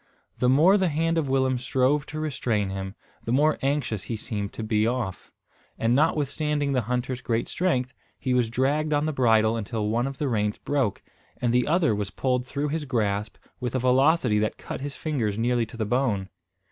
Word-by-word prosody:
The 125 - +3
more 165 +10 +5
the 190 - +2
hand 165 +1 +1
of 145 -4 -2
Willem 130 -1 +2
strove 130 +3 +1
to 155 +3 -5
restrain 115 -10 -1
him, 95 +1 -5 0.3
the 115 - -3
more 150 +5 +3
anxious 135 -7 -1
he 115 - -3
seemed 105 -2 -4
to 110 - -5
be 110 0 +1
off; 120 -6 -3 0.5
and 115 +1 +1
notwithstanding 150 0 +1
the 130 - +2
hunter's 125 0 -2
great 115 -1 -1
strength, 135 -8 0 0.2
he 130 - -1
was 125 -3 +2
dragged 145 +6 +1
on 145 +1 +2
the 155 - -1
bridle 115 -4 +3
until 110 -1 -2
one 120 +4 +1
of 135 -1 -6
the 145 - -1
reins 105 -4 0
broke; 130 -9 -1 0.4
and 120 -1 +1
the 125 0 +2
other 160 -7 +3
was 100 -1 -2
pulled 125 +4 -1
through 145 +3 -2
his 155 0 -2
grasp 105 -5 -1 0.2
with 125 0 -3
a - - +3
velocity 130 -2 +3
that 105 0 -1
cut - - -7
his 140 0 -5
fingers 120 -10 -2
nearly 120 0 +1
to 115 - -11
the 110 - -1
bone. 105 -5 0
125 Hz, 195 wpm, -26 LUFS, 110-145 Hz, 0.5 s, more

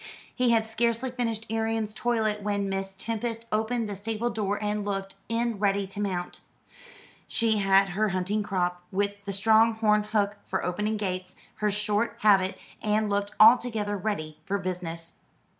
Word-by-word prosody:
He 250 -1 +2
had 225 -1 +3
scarcely 235 +3 0
finished 230 -3 -2
Arion's 225 -1 -1
toilet 220 -2 0
when 200 -1 -1
Miss 195 0 -3
Tempest 230 +2 -3
opened 225 +1 0
the 205 - -4
stable 225 +4 -2
door 205 -2 -1
and 210 0 -1
looked 195 -1 -3 0.2
in, 230 -2 0
ready 200 -1 +2
to 195 +1 -8
mount. 185 -3 -3 0.9
She 225 -2 +2
had 195 0 +4
her 210 +4 +1
hunting 190 +3 -1
crop, 180 -3 -1
with 200 +1 -1
the 200 - -3
strong 220 +3 +4
horn 210 -1 +3
hook 205 -1 0
for - - -2
opening 210 +5 -1
gates, 185 -3 -4 0.2
her 210 - +1
short 210 +2 0
habit, 195 -3 +4 0.2
and 215 0 +1
looked 200 0 -1
altogether 220 -2 +5
ready 155 -7 -3
for 200 +3 -1
business. 175 -3 -5
210 Hz, 160 wpm, -27 LUFS, 195-225 Hz, 0.9 s, altogether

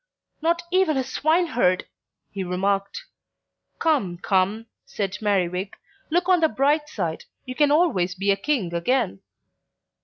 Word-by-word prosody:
"Not 340 +2 +1
even 365 -6 +2
a 265 - +1
swineherd!" 285 - +1 0.5
he 195 -1 -4
remarked. 195 - -1 0.7
"Come, 265 - +1
come," 195 +4 0 0.2
said 195 -2 -4
Merriwig, 190 -2 0 0.4
"look 350 +3 +1
on 365 -1 +5
the 320 -1 +3
bright 295 +6 +1
side; 170 - -4 0.2
you 255 - -5
can 295 +2 +3
always 285 - +2
be 200 +1 +1
a - - +3
King 200 - -1
again." 190 - 0
220 Hz, 130 wpm, -24 LUFS, 185-310 Hz, 0.7 s, on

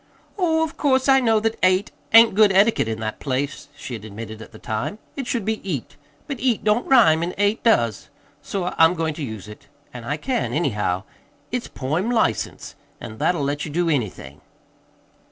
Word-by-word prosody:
"Oh, 325 -5 +1
of 320 0 -5
course 265 -2 +2
I 270 0 +6
know 225 -4 +3
that 225 0 -1
'ate' 185 +2 +2 0.2
ain't 225 0 +8
good 210 0 +5
etiquette 200 - +3
in 110 -1 -3
that 110 -1 -4
place," 140 +2 -3
she 125 - -7
had 110 -3 -6
admitted 110 +1 -8
at - - -11
the 110 - -12
time. 110 - -4 0.2
"It 270 -3 -5
should 230 -5 -2
be 220 0 -2
'eat.' 155 -11 -5 0.3
But 275 -4 -5
'eat' 245 -4 0
don't 215 +3 +1
rhyme, 205 -12 +5
an' 175 +2 -3
'ate' 205 +2 +1
does. 115 - +1 0.3
So 180 -2 -3
I'm 165 +2 +6
goin' 160 -2 -1
to 150 - -6
use 110 -6 -7
it. 105 - -13 0.3
An' 125 -1 -8
I 145 +6 -2
can, 250 - -2
anyhow. 105 - -1 0.5
It's 245 -1 -3
poem 155 - -2
license; 220 - -1 0.3
an' 110 -2 -9
that'll 170 -5 +1
let 145 +1 -2
you - - -5
do 170 +3 0
anything." 105 - -3
170 Hz, 190 wpm, -22 LUFS, -, 0.5 s, ain't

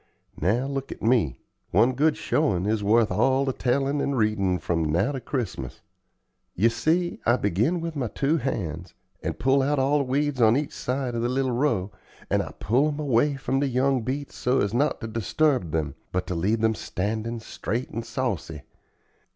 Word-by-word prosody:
Now 115 +8 +2
look 135 -1 -4
at - - -8
me. 110 - +2 0.3
One 125 +2 +4
good 150 +4 +2
showin' 100 - +1
is 105 0 0
worth 110 +1 +3
all 130 +4 +2
the 135 - 0
tellin' 135 +3 0
and 140 -1 -1
readin' 105 -5 +1
from 85 -2 -1
now 95 - +2
to 135 -3 -4
Christmas. 105 - -4 0.7
You 110 +6 +4
see, 170 +8 0
I 120 - +4
begin 115 - +1
with 165 -1 -4
my 130 -4 -1
two 140 +8 0
hands, 90 - -4 0.3
and - - -3
pull 135 +1 +3
out 145 +2 +1
all 140 +2 +3
the - - +1
weeds 135 0 0
on 115 +2 +5
each 145 -1 -3
side 130 -1 -2
of 115 - -1
the 120 - 0
little 130 0 0
row, 120 -7 0 0.4
and - - +3
I - - -6
pull 130 +8 +1
'em 150 -1 -3
away 140 0 +2
from 135 0 -1
the 140 - +1
young 130 0 +1
beets 135 +5 -4
so 125 +2 +1
as 100 +1 -1
not 140 +4 +1
to 110 - -4
disturb 115 - +1
them, 75 -2 -1 0.2
but 90 0 -1
to 90 - -3
leave 105 +7 0
'em 110 0 +4
standin' 110 +3 -3
straight 115 +2 -4
and 115 - -4
saucy. 105 - -3
125 Hz, 190 wpm, -25 LUFS, 105-140 Hz, 0.7 s, on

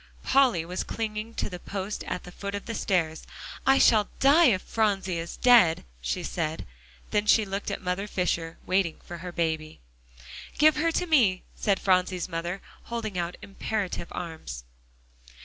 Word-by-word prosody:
Polly 255 -11 +3
was 180 +2 -3
clinging 220 0 -4
to - - -1
the 180 -2 -7
post 195 +2 -5
at 180 - -4
the 180 - -10
foot 200 +2 -5
of 200 - -5
the 230 - -4
stairs. 165 -7 0 0.5
"I 270 0 +6
shall 215 -5 +5
die 295 +5 +6
if 190 -7 +2
Phronsie 195 -5 0
is 170 +1 -6
dead," 230 -10 +5 0.2
she - - -2
said. 160 -2 -3 0.5
Then 210 0 +1
she 215 0 +5
looked 195 +1 -4
at - - -4
Mother 180 +3 -2
Fisher, 170 -4 -1
waiting 185 -3 +1
for 175 -1 -8
her 180 +1 -6
baby. 160 -2 -2 0.8
"Give 305 0 +5
her 330 +2 +2
to 360 - 0
me!" 235 - +3
said 200 -3 0
Phronsie's 185 -1 +1
mother, 175 +2 -4 0.2
holding 225 -4 -4
out 175 0 -2
imperative 200 -3 -3
arms. 160 - -6
190 Hz, 165 wpm, -27 LUFS, 170-220 Hz, 0.8 s, I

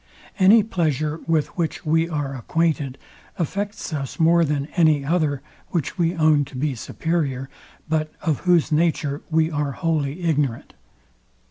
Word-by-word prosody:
Any 205 +4 +7
pleasure, 155 - -1
with 160 -3 0
which 165 -1 -2
we 160 +2 +2
are 145 -4 -3
acquainted, 145 0 -1 0.4
affects 200 +2 -3
us 135 -3 -4
more 170 +1 +5
than 145 -2 0
any 155 -5 +3
other, 150 -4 0 0.2
which 170 +1 -3
we 170 +1 +2
own 155 -3 +4
to 135 - -13
be 145 +1 0
superior, 135 0 -2 0.4
but 155 -1 0
of 155 -4 0
whose 175 -4 +2
nature 150 -2 +1
we 160 0 +2
are 145 -2 -1
wholly 160 0 -1
ignorant. 145 -8 -1
155 Hz, 140 wpm, -23 LUFS, 145-170 Hz, 0.4 s, Any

